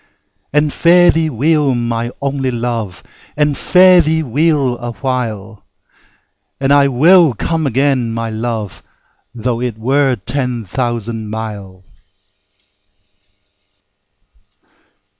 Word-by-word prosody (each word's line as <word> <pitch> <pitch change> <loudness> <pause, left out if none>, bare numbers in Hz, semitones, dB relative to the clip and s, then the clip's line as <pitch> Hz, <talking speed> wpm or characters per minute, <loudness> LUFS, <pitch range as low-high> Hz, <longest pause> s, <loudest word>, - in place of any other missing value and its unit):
And 150 0 +1
fare 175 +1 +5
thee 160 -1 0
weel, 145 +1 +1
my 120 0 -2
only 135 -1 -1
Luve, 115 -6 -4 0.3
And 150 -1 +1
fare 185 +2 +5
thee 160 0 0
weel 140 -1 +1
a 120 0 -6
while! 110 -6 -4 1.0
And 135 +1 +2
I 140 -1 +5
will 155 +2 +4
come 160 +6 -2
again, 130 -2 0
my 115 0 -4
Luve, 110 -2 -4 0.5
Tho' 120 +1 -3
it 120 -3 -3
were 135 +3 +1
ten 120 +1 -3
thousand 115 0 -3
mile. 105 -4 -7
125 Hz, 105 wpm, -15 LUFS, 115-145 Hz, 1.0 s, fare